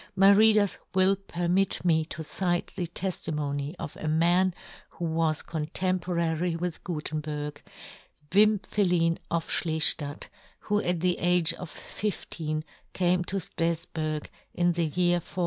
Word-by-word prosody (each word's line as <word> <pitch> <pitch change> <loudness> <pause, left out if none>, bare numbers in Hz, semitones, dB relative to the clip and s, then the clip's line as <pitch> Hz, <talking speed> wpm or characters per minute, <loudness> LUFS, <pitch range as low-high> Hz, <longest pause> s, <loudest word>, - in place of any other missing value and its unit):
My 195 +1 +7
readers 210 -1 +5 0.2
will 190 +1 +4
permit 180 0 0
me 160 -2 +3
to 160 0 -7
cite 175 +2 -1
the 175 - -2
teftimony 150 -4 -3
of 145 - -6
a 155 - -5
man 175 +4 +3 0.4
who 175 - -2
was 160 -1 0
contemporary 170 +1 -1
with 170 0 -4
Gutenberg, 150 -3 -4 0.7
Wim 210 +1 +4
phelin 175 -4 +1
of 170 -1 -1
Schleftadt, 155 -2 +1 0.3
who 210 0 0
at 175 -2 -1
the 180 0 +1
age 175 -1 +3
of 175 0 -8
fifteen 155 -7 -4 0.3
came 180 0 +2
to 195 - -3
Strafburg, 165 -3 -2 0.3
in 175 0 +3
the 170 -1 0
year 175 +2 +2
1465. 175 - -10
170 Hz, 130 wpm, -27 LUFS, 160-185 Hz, 0.7 s, My